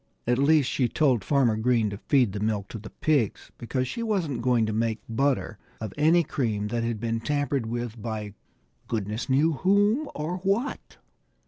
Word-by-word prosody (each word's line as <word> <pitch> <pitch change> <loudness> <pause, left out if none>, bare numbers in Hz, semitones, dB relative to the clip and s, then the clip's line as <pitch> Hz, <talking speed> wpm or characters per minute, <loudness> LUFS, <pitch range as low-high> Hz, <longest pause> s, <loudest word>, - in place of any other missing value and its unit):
At 120 +1 +1
least, 145 -1 +4
she 130 -2 +1
told 130 -8 +2
Farmer 130 -5 +2
Green 110 -1 +1
to 100 - -6
feed 125 -6 +2
the 105 - -3
milk 105 -2 -1
to 110 - -6
the 105 +1 -10
pigs, 140 -9 0
because 130 +2 -2
she 230 - -4
wasn't 180 - -1
going 120 -2 +2
to 110 - -2
make 110 0 0
butter 125 -2 0 0.2
of 110 -3 -5
any 165 +4 +4
cream 110 -9 -2
that 115 +1 -1
had 115 -2 -2
been 115 0 -1
tampered 140 -1 -1
with 120 -1 -4
by 105 -2 -4 0.5
goodness 110 +2 -3
knew 145 +5 +3
whom 205 - +2
or 155 +5 -3
what. 200 +8 -2
120 Hz, 180 wpm, -26 LUFS, 110-150 Hz, 0.5 s, least